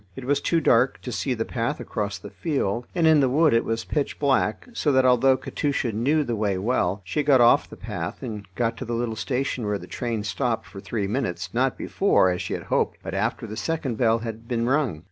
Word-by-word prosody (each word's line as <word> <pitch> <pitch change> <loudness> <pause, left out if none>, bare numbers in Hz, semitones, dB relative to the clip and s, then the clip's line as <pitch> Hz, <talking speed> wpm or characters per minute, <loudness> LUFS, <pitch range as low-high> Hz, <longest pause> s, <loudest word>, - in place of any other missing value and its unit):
It 130 - -7
was 145 +1 +1
too 170 - +2
dark 125 -2 +3
to 125 - -5
see 130 +1 -1
the 115 0 -2
path 125 +5 -2
across 105 -1 -3
the 100 - -10
field, 120 - -2
and 170 -2 +2
in 160 -1 +6
the 135 -2 +3
wood 155 +3 +4
it 115 - +3
was 115 0 -2
pitch 145 -2 -2
black, 135 -7 +1
so 155 -9 +1
that 130 -1 +4
although 130 +1 +5
Katusha 140 -3 -2
knew 140 +9 +1
the 120 -4 -2
way 105 -3 0
well, 100 -2 0
she 150 - -1
got 140 -2 +4
off 120 0 +5
the - - -11
path, - - -5
and 105 -3 -6
got 115 0 0
to 130 - -5
the 120 0 -2
little 115 -1 -2
station 125 +1 -2
where 105 0 0
the 90 - -10
train 115 +4 -3
stopped 115 +4 -1
for 100 - -10
three 105 +1 -3
minutes, 100 -5 -3
not 130 +2 +1
before, 190 - +2
as 90 - -2
she - - -3
had - - -6
hoped, - - 0
but - - -5
after - - -1
the 110 -1 -7
second 135 +1 -2
bell 115 -2 +4
had 115 0 -7
been 115 -1 0
rung. 130 - +1
120 Hz, 235 wpm, -24 LUFS, 110-135 Hz, -, in